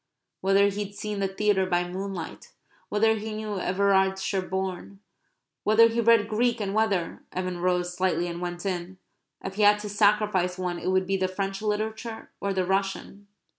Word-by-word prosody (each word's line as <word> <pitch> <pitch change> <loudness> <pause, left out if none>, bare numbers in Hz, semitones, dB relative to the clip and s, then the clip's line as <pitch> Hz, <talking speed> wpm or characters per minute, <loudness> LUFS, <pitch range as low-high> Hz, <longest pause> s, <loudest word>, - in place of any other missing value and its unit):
whether 195 +1 +4
he'd 205 0 -5
seen 210 -1 -4
the 195 - +1
theatre 195 -1 +1
by 175 -1 +1
moonlight; 185 -1 -6 0.4
whether 220 +1 +3
he 215 0 -5
knew 215 -2 -4
Everard 190 +1 +2
Sherborn; 190 0 -3 0.6
whether 225 +2 +6
he 230 +1 0
read 230 -2 +5
Greek 235 +2 +1
and 200 -2 -2
whether 205 -6 0
(Evan 185 -1 -3
rose 180 0 0
silently 185 -1 +1
and 170 0 -5
went 175 +1 -5
in) 185 -1 -3 0.5
if 190 - -4
he - - 0
had 205 0 +6
to 210 - -5
sacrifice 205 -3 +2
one 180 -2 -3
it - - -5
would 185 0 +2
be 195 +1 0
the 185 0 +1
French 195 +1 -3
literature 220 +2 -3
or 200 - -1
the 190 -1 0
Russian? 195 +1 -2
195 Hz, 170 wpm, -26 LUFS, 185-210 Hz, 0.6 s, whether